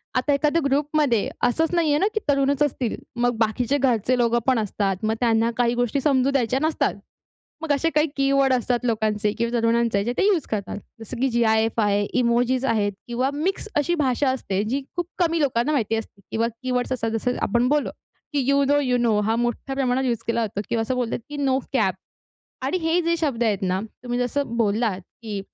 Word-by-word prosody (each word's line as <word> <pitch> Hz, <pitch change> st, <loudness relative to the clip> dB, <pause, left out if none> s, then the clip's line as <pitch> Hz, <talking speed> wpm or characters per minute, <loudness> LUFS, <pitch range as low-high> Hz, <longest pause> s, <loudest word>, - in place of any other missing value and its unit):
आता 255 Hz, +3 st, +2 dB
एखाद्या 300 Hz, +4 st, +2 dB
ग्रुपमध्ये 285 Hz, -4 st, +1 dB
असंच 320 Hz, +7 st, +1 dB
नाही 335 Hz, -3 st, +2 dB
आहे 295 Hz, -, +3 dB
ना 395 Hz, -, +3 dB
की -, -, +2 dB
तरुणच 275 Hz, +1 st, +2 dB
असतील, 255 Hz, -5 st, -1 dB, 0.2 s
मग 240 Hz, -1 st, 0 dB
बाकीचे 245 Hz, +5 st, -1 dB
घरचे 250 Hz, -2 st, +1 dB
लोकं 235 Hz, 0 st, +2 dB
पण 255 Hz, -3 st, +3 dB
असतात. 200 Hz, -2 st, -1 dB
मग 220 Hz, -, +1 dB
त्यांना 230 Hz, -1 st, +2 dB
काही 240 Hz, -1 st, +2 dB
गोष्टी 245 Hz, +3 st, 0 dB
समजू 270 Hz, -1 st, +2 dB
द्यायच्या 260 Hz, -1 st, +1 dB
नसतात. 315 Hz, 0 st, +1 dB, 0.7 s
मग 305 Hz, -3 st, 0 dB
असे 325 Hz, +4 st, +1 dB
काही 300 Hz, +1 st, +4 dB
कीवर्ड 275 Hz, -1 st, +3 dB
असतात 245 Hz, -1 st, 0 dB
लोकांचे 215 Hz, -2 st, 0 dB
किंवा 235 Hz, +1 st, 0 dB
तरुणांचे 230 Hz, -2 st, +2 dB
जे 240 Hz, -, -1 dB
ते 395 Hz, -, +3 dB
यूज 375 Hz, -8 st, +2 dB
करतात. 205 Hz, -1 st, -3 dB, 0.2 s
जसं 225 Hz, +3 st, -7 dB
की 270 Hz, -, +2 dB
जी-आय-एफ 225 Hz, -1 st, +2 dB
आहे, 205 Hz, -1 st, +2 dB, 0.2 s
इमोजीज 245 Hz, +2 st, +1 dB
आहेत 205 Hz, -4 st, +1 dB, 0.2 s
किंवा 255 Hz, +3 st, 0 dB
मिक्स 375 Hz, +8 st, -2 dB
अशी 295 Hz, +4 st, +2 dB
भाषा 270 Hz, -3 st, +1 dB
असते, 200 Hz, -6 st, -2 dB
जी 260 Hz, +6 st, -1 dB, 0.2 s
खूप 350 Hz, -1 st, -1 dB
कमी 335 Hz, -2 st, +1 dB
लोकांना 270 Hz, 0 st, +1 dB
माहिती 225 Hz, -6 st, 0 dB
असते. 220 Hz, -2 st, -7 dB
किंवा 225 Hz, +1 st, 0 dB, 0.2 s
कीवर्ड्स 250 Hz, 0 st, -1 dB
असतात 225 Hz, -3 st, -1 dB
जसं 235 Hz, +3 st, -1 dB
आपण 240 Hz, +4 st, +2 dB
बोललो, 295 Hz, 0 st, +1 dB, 0.4 s
की 290 Hz, -, +1 dB
"यू 280 Hz, 0 st, +4 dB
नो 290 Hz, -, +4 dB
यू 250 Hz, -3 st, +1 dB
नो" 225 Hz, -3 st, +2 dB
हा 220 Hz, +2 st, 0 dB
मोठ्या 240 Hz, +3 st, -2 dB
प्रमाणात 265 Hz, -1 st, +1 dB
यूज 235 Hz, -2 st, -1 dB
केला 230 Hz, 0 st, +1 dB
जातो 200 Hz, -1 st, -5 dB
किंवा 230 Hz, -1 st, 0 dB
असं 240 Hz, +3 st, -2 dB
बोलतात 245 Hz, -2 st, -1 dB
की 295 Hz, -, -6 dB
"नो 270 Hz, -2 st, +1 dB
कॅप." 210 Hz, -8 st, +2 dB, 0.7 s
आणि 275 Hz, +7 st, 0 dB
हे 325 Hz, +2 st, +2 dB
जे 335 Hz, 0 st, +1 dB
शब्द 280 Hz, -8 st, -1 dB
आहेत 205 Hz, -3 st, 0 dB
ना, 185 Hz, +1 st, 0 dB, 0.2 s
तुम्ही 245 Hz, 0 st, -2 dB
जसं 245 Hz, 0 st, -1 dB
बोललात 215 Hz, -3 st, +1 dB, 0.2 s
की 210 Hz, -3 st, -4 dB
245 Hz, 200 wpm, -23 LUFS, 225-280 Hz, 0.7 s, काही